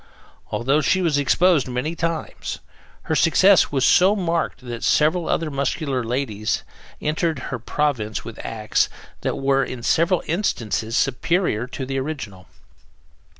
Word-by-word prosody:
Although 135 +5 +1
she 190 - +2
was 155 -4 +2
exposed 165 +1 +3
many 125 +6 -2
times, 165 -1 -3 0.5
her - - -2
success 185 +4 +5
was 135 -2 +2
so 190 +3 +5
marked 170 -7 -1
that 120 -2 -7
several 160 +3 +2
other 160 -2 0
muscular 140 -1 -1
ladies 115 -3 -2 0.4
entered 155 +1 -1 0.2
her 130 - -3
province 115 -4 -2
with 115 - -8
acts 110 -2 0 0.3
that - - -2
were, 135 0 +2
in 125 -3 -6
several 170 +6 +2
instances, 115 - -1
superior 135 - 0
to 135 0 -5
the 135 +1 -2
original. 130 - -6
140 Hz, 135 wpm, -22 LUFS, 125-165 Hz, 0.5 s, success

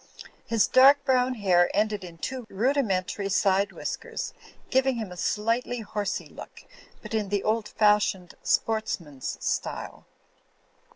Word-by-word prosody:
His 225 -2 +3
dark 280 +2 +6
brown 255 -1 +2
hair 180 -5 +3
ended 210 -1 0
in 170 -2 -10
two 255 +5 -5
rudi 260 +9 +1
mentary 195 -2 -2
side 195 +1 +2
whiskers, - - -5 0.4
giving 265 0 +3
him 220 -5 -5
a - - -8
slightly 230 +6 -1
horsey 210 -1 -3
look, - - -12 0.4
but - - -8
in 215 -3 -1
the 205 -1 0
old 220 0 0
fashioned 210 -4 +2
sportsman's 170 -11 -1
style. - - -3
210 Hz, 130 wpm, -26 LUFS, 195-245 Hz, 0.4 s, dark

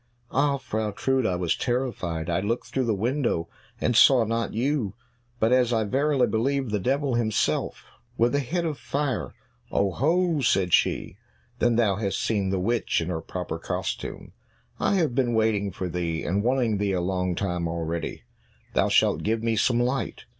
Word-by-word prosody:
"Ah, 140 +1 +2
Frau 110 -5 -3
Trude, 130 +3 0
I 90 - 0
was 90 -2 0
terrified; 115 -11 -2
I 85 +1 +1
looked 110 +5 -3
through 130 -1 +1
the 110 -2 +1
window 115 - 0 0.3
and 120 - +1
saw 125 +1 +7
not 115 +1 -1
you, 120 -3 -1 0.4
but, 110 +1 +2
as 125 -1 +4
I 110 -2 +2
verily 135 +4 +2
believe, 125 +3 0
the 105 - 0
devil 135 +5 0
himself 115 -3 0 0.3
with 120 +3 +3
a 145 - +2
head 170 +6 -2
of 155 -3 -3
fire." 130 - -2 0.4
"Oho!" 155 - +1
said 95 -7 +2
she, - - +2 0.4
"then 120 -1 +3
thou 105 -5 +2
hast 100 -2 -1
seen 100 -4 0
the 95 -1 0
witch 115 +5 0
in 85 +1 -3
her 80 -2 -2
proper 85 -1 -5
costume. - - -4 0.5
I - - +2
have 160 -9 +1
been 120 -2 +1
waiting 110 -3 +1
for 95 +1 -4
thee, 85 -2 -2
and 95 +4 0
wanting 120 -3 +1
thee 100 -1 0
a 90 - +1
long 90 0 -1
time 90 -3 -1
already; 85 0 -4 0.5
thou - - +2
shalt - - +3
give 110 +1 -1
me 115 -1 +1
some 120 +2 +2
light." 125 +1 -1
115 Hz, 175 wpm, -26 LUFS, 95-130 Hz, 0.5 s, saw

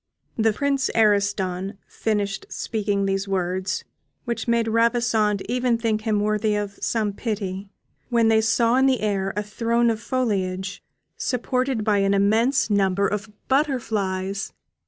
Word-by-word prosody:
The 220 -1 +3
Prince 275 +4 0
Ariston 200 -3 +1
finished 205 -3 -2
speaking 205 -3 -1
these 195 0 -1
words, 185 0 -1 0.4
which 235 -2 -3
made 235 -1 +2
Ravissante 225 -3 +2
even 245 -1 +1
think 225 -2 0
him 215 -2 0
worthy 215 0 +1
of 205 -1 -4
some 215 -3 0
pity, 200 -3 -4 0.4
when 235 -2 +3
they 220 0 +4
saw 230 +2 +3
in 265 +1 +4
the 260 -3 +2
air 195 -2 0
a 210 - 0
throne 230 +3 +1
of 220 0 -4
foliage, 200 -6 -2 0.4
supported 255 -1 -1
by 210 -1 +2
an 195 0 +2
immense 220 +7 +3
number 200 -1 +2
of 210 +2 -3 0.2
butterflies. 205 -9 -1
215 Hz, 135 wpm, -23 LUFS, 200-235 Hz, 0.4 s, they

